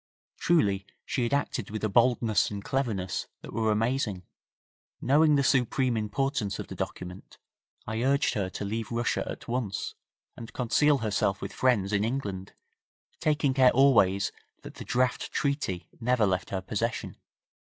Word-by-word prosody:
Truly 100 Hz, -, +2 dB, 0.2 s
she 130 Hz, -, -1 dB
had 120 Hz, -, 0 dB
acted 140 Hz, -6 st, -1 dB
with 110 Hz, +1 st, -5 dB
a -, -, +3 dB
boldness 115 Hz, 0 st, +3 dB
and 100 Hz, -1 st, -6 dB
cleverness 110 Hz, -10 st, -2 dB
that -, -, -10 dB
were 110 Hz, -1 st, +1 dB
amazing. 110 Hz, -3 st, 0 dB, 0.8 s
Knowing 150 Hz, +3 st, +4 dB
the 140 Hz, -, +3 dB
supreme 130 Hz, -1 st, +2 dB
importance 110 Hz, 0 st, -1 dB
of -, -, -7 dB
the -, -, -6 dB
document, 90 Hz, +1 st, -6 dB, 0.5 s
I 110 Hz, +1 st, -3 dB
urged 140 Hz, +3 st, +2 dB
her 100 Hz, -3 st, -1 dB
to 100 Hz, -, -5 dB
leave 110 Hz, +3 st, -3 dB
Russia 120 Hz, 0 st, 0 dB
at -, -, -7 dB
once, 115 Hz, -7 st, -2 dB, 0.4 s
and 115 Hz, -, -10 dB
conceal 145 Hz, +4 st, +3 dB
herself 100 Hz, -2 st, 0 dB
with -, -, -6 dB
friends 105 Hz, -6 st, +2 dB
in 100 Hz, 0 st, +2 dB
England, 105 Hz, -6 st, -3 dB, 0.7 s
taking 150 Hz, -3 st, +1 dB
care 130 Hz, -1 st, +6 dB
always 115 Hz, -8 st, +4 dB, 0.3 s
that -, -, -9 dB
the -, -, -9 dB
draft 125 Hz, 0 st, 0 dB
treaty 140 Hz, -, -1 dB
never 125 Hz, -2 st, +2 dB
left 95 Hz, -1 st, -1 dB
her 95 Hz, -1 st, -2 dB
possession. 110 Hz, +4 st, -3 dB
115 Hz, 150 wpm, -28 LUFS, 100-130 Hz, 0.8 s, care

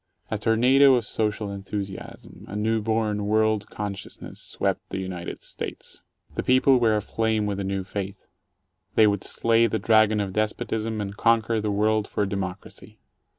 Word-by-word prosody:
A 110 Hz, -, -1 dB
tornado 130 Hz, +5 st, +5 dB
of 120 Hz, -3 st, 0 dB
social 105 Hz, -2 st, -2 dB
enthusiasm, 100 Hz, -1 st, -7 dB
a 100 Hz, -, -7 dB
new 110 Hz, +1 st, +1 dB
born 105 Hz, -1 st, 0 dB
world 110 Hz, -1 st, +2 dB
consciousness, 100 Hz, -1 st, -6 dB
swept -, -, -1 dB
the -, -, -4 dB
United 95 Hz, -2 st, -5 dB
States. -, -, -5 dB, 0.3 s
The -, -, -2 dB
people 130 Hz, 0 st, +4 dB
were 115 Hz, -2 st, +3 dB
aflame 110 Hz, 0 st, 0 dB
with 100 Hz, -1 st, -2 dB
a -, -, -2 dB
new 95 Hz, 0 st, -2 dB
faith; 100 Hz, +1 st, -6 dB, 0.7 s
they 110 Hz, -, +7 dB
would 100 Hz, -2 st, +1 dB
slay 115 Hz, 0 st, +2 dB
the 110 Hz, -, -1 dB
Dragon 110 Hz, 0 st, +4 dB
of 100 Hz, -2 st, -2 dB
Despotism, 110 Hz, +1 st, -1 dB
and 100 Hz, 0 st, -5 dB
conquer 115 Hz, 0 st, +2 dB
the 105 Hz, -, -1 dB
world 105 Hz, +1 st, +1 dB
for 105 Hz, -, -1 dB
democracy. 95 Hz, -1 st, -6 dB
105 Hz, 155 wpm, -25 LUFS, 100-110 Hz, 0.7 s, they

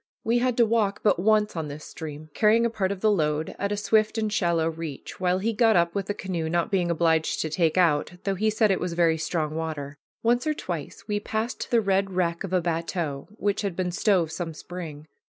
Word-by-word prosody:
We 235 Hz, +2 st, +2 dB
had 250 Hz, -1 st, 0 dB
to 235 Hz, -, +6 dB
walk 215 Hz, -3 st, +1 dB
but 200 Hz, -5 st, +3 dB
once 210 Hz, +1 st, +2 dB
on 160 Hz, -2 st, -3 dB
this 145 Hz, +1 st, -8 dB
stream, 155 Hz, -1 st, -8 dB
carrying 225 Hz, +2 st, +4 dB
a 235 Hz, -, 0 dB
part 200 Hz, -4 st, -1 dB
of 195 Hz, -2 st, -5 dB
the 215 Hz, -, +4 dB
load, 155 Hz, -4 st, 0 dB
at 200 Hz, 0 st, -1 dB
a 205 Hz, -, -1 dB
swift 215 Hz, +1 st, +2 dB
and 215 Hz, -1 st, -1 dB
shallow 170 Hz, -5 st, +2 dB
reach, 160 Hz, -3 st, -6 dB
while 180 Hz, 0 st, +2 dB
he 220 Hz, +4 st, -1 dB
got 225 Hz, -1 st, +4 dB
up 170 Hz, 0 st, +3 dB
with 195 Hz, -1 st, -2 dB
the 205 Hz, -, -2 dB
canoe, 175 Hz, -6 st, -3 dB
not 170 Hz, +4 st, 0 dB
being 180 Hz, -3 st, +1 dB
obliged 160 Hz, -1 st, +2 dB
to 155 Hz, -, -3 dB
take 165 Hz, +1 st, +1 dB
out, 165 Hz, -3 st, +3 dB
though 195 Hz, -, 0 dB
he 215 Hz, +3 st, +1 dB
said 215 Hz, -1 st, +3 dB
it 190 Hz, -, +1 dB
was 180 Hz, -1 st, -2 dB
very 165 Hz, -2 st, +2 dB
strong 155 Hz, -2 st, -1 dB
water. 155 Hz, -3 st, -4 dB, 0.2 s
Once 240 Hz, +5 st, +2 dB
or 305 Hz, -, +1 dB
twice 165 Hz, -, -6 dB
we 205 Hz, 0 st, 0 dB
passed 220 Hz, +3 st, -3 dB
the 235 Hz, -2 st, +4 dB
red 195 Hz, -1 st, +1 dB
wreck 170 Hz, -2 st, 0 dB
of 195 Hz, -, -5 dB
a 185 Hz, -1 st, +2 dB
bateau 165 Hz, -4 st, -2 dB
which 205 Hz, -1 st, 0 dB
had 200 Hz, -4 st, -2 dB
been 180 Hz, -1 st, -1 dB
stove 180 Hz, -3 st, +2 dB
some 165 Hz, -1 st, -4 dB
spring. 160 Hz, -4 st, -8 dB
180 Hz, 230 wpm, -26 LUFS, 160-210 Hz, 0.2 s, to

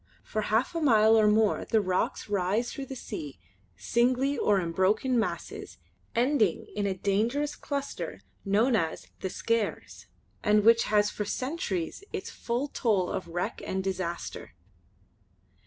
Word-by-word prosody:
For 215 Hz, -, -2 dB
half 225 Hz, +9 st, +1 dB
a 335 Hz, -, -2 dB
mile 220 Hz, -6 st, +5 dB
or 215 Hz, -1 st, +5 dB
more 215 Hz, 0 st, +3 dB
the 220 Hz, -, +2 dB
rocks 185 Hz, -2 st, -1 dB
rise 205 Hz, +4 st, 0 dB
through 270 Hz, -1 st, -6 dB
the 265 Hz, -, -6 dB
sea 145 Hz, -, -7 dB, 0.4 s
singly 255 Hz, -, +1 dB
or 205 Hz, -7 st, +2 dB
in 170 Hz, -2 st, -2 dB
broken 215 Hz, +8 st, +2 dB
masses 220 Hz, -, -4 dB, 0.4 s
ending 235 Hz, -, +2 dB
in 205 Hz, -1 st, 0 dB
a 190 Hz, -, -1 dB
dangerous 230 Hz, +10 st, 0 dB
cluster 280 Hz, -1 st, -4 dB, 0.2 s
known 220 Hz, +5 st, +3 dB
as 165 Hz, -6 st, -1 dB
"The 190 Hz, -, -3 dB
Skares" 230 Hz, +2 st, -2 dB, 0.4 s
and 210 Hz, 0 st, +4 dB
which 230 Hz, +1 st, +6 dB
has 210 Hz, -1 st, +3 dB
had -, -, -12 dB
for 210 Hz, -, -2 dB
centuries 255 Hz, -, -3 dB
its -, -, -5 dB
full 245 Hz, +5 st, -2 dB
toll 205 Hz, -10 st, +1 dB
of -, -, -3 dB
wreck 175 Hz, +1 st, -3 dB
and 190 Hz, 0 st, -2 dB
disaster. 185 Hz, -, -4 dB
215 Hz, 150 wpm, -28 LUFS, 190-245 Hz, 0.4 s, which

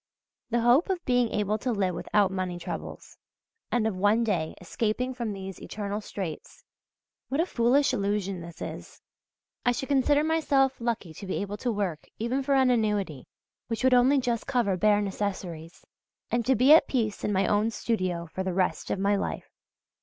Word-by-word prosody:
The 235 Hz, 0 st, +1 dB
hope 245 Hz, +10 st, +4 dB
of 365 Hz, -2 st, -2 dB
being 245 Hz, -2 st, +2 dB
able 210 Hz, 0 st, -1 dB
to 250 Hz, +3 st, -1 dB
live 195 Hz, -5 st, 0 dB
without 195 Hz, +3 st, +1 dB
money 185 Hz, -2 st, -3 dB
troubles, 175 Hz, -, -7 dB, 0.5 s
and 240 Hz, -3 st, +1 dB
of 220 Hz, -3 st, 0 dB
one 205 Hz, +5 st, +3 dB
day 175 Hz, -8 st, -1 dB
escaping 230 Hz, +7 st, -2 dB
from 235 Hz, -3 st, -3 dB
these 195 Hz, -1 st, -7 dB
eternal 205 Hz, 0 st, -4 dB
straits 190 Hz, -6 st, -7 dB, 0.7 s
what 275 Hz, -, -1 dB
a 335 Hz, -, +3 dB
foolish 260 Hz, -1 st, +2 dB
illusion 200 Hz, -2 st, -1 dB
this 170 Hz, -1 st, -8 dB
is! -, -, -8 dB, 0.6 s
I 245 Hz, -, +3 dB
should 265 Hz, +3 st, -4 dB
consider 285 Hz, +2 st, +3 dB
myself 290 Hz, -4 st, +2 dB
lucky 230 Hz, -8 st, -2 dB
to 195 Hz, -, -9 dB
be 185 Hz, -, -2 dB
able 205 Hz, +1 st, -3 dB
to 245 Hz, +3 st, -1 dB
work 195 Hz, -7 st, -3 dB
even 240 Hz, +5 st, -1 dB
for 275 Hz, +1 st, +1 dB
an 260 Hz, -1 st, +4 dB
annuity 210 Hz, -, -1 dB, 0.4 s
which 230 Hz, -1 st, -3 dB
would 260 Hz, 0 st, +5 dB
only 250 Hz, +3 st, +5 dB
just 245 Hz, -3 st, -1 dB
cover 240 Hz, -8 st, +1 dB
bare 205 Hz, +2 st, +3 dB
necessaries, 185 Hz, -5 st, -4 dB, 0.5 s
and 240 Hz, 0 st, +1 dB
to 265 Hz, -, +4 dB
be 255 Hz, +6 st, +6 dB
at 320 Hz, -, +6 dB
peace 225 Hz, -6 st, -1 dB
in -, -, 0 dB
my 195 Hz, -1 st, +2 dB
own 210 Hz, +2 st, +2 dB
studio 185 Hz, -7 st, -2 dB
for 190 Hz, -, -3 dB
the 185 Hz, -1 st, -2 dB
rest 185 Hz, -1 st, 0 dB
of -, -, 0 dB
my 200 Hz, +2 st, +2 dB
life. 200 Hz, -, -4 dB
215 Hz, 185 wpm, -27 LUFS, 195-250 Hz, 0.7 s, be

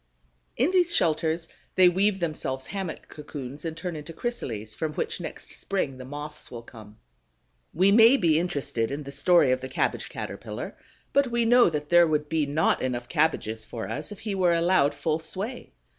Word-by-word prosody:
In 265 Hz, +9 st, +2 dB
these 355 Hz, -2 st, +3 dB
shelters 160 Hz, 0 st, +1 dB, 0.3 s
they 185 Hz, -1 st, +7 dB
weave 190 Hz, +3 st, +2 dB
themselves 150 Hz, -6 st, -3 dB
hammock 190 Hz, -5 st, -5 dB
cocoons 145 Hz, -2 st, -8 dB
and 165 Hz, -1 st, -4 dB
turn 180 Hz, -1 st, -4 dB
into 155 Hz, +2 st, -8 dB
chrysales, 115 Hz, -, -4 dB
from 155 Hz, -1 st, -3 dB
which -, -, -3 dB
next -, -, -8 dB
spring 140 Hz, -10 st, -2 dB
the 130 Hz, -, -8 dB
Moths 145 Hz, +2 st, -8 dB
will 120 Hz, -1 st, -8 dB
come. 110 Hz, -3 st, -14 dB, 0.7 s
We 190 Hz, +4 st, +4 dB
may 230 Hz, +5 st, +7 dB
be 160 Hz, -, +3 dB
interested 140 Hz, -9 st, -2 dB
in 145 Hz, +2 st, -4 dB
the 140 Hz, -, -8 dB
story 145 Hz, 0 st, +4 dB
of 130 Hz, 0 st, +1 dB
the 130 Hz, -, -6 dB
Cabbage 130 Hz, -, -1 dB
caterpillar, -, -, -6 dB, 0.4 s
but 280 Hz, -1 st, +4 dB
we 235 Hz, -1 st, 0 dB
know 240 Hz, -2 st, +6 dB
that 150 Hz, -2 st, -4 dB
there 175 Hz, 0 st, +6 dB
would 150 Hz, -1 st, 0 dB
be 155 Hz, -3 st, +1 dB
not 150 Hz, +3 st, +2 dB
enough 125 Hz, -2 st, -3 dB
cabbages 145 Hz, -9 st, 0 dB
for 115 Hz, 0 st, -6 dB
us 150 Hz, +5 st, -4 dB
if 210 Hz, -, -7 dB
he 215 Hz, -2 st, -3 dB
were 180 Hz, -3 st, +3 dB
allowed 170 Hz, -4 st, +3 dB
full 160 Hz, 0 st, -1 dB
sway. 205 Hz, +9 st, -4 dB
160 Hz, 185 wpm, -26 LUFS, 140-185 Hz, 0.7 s, they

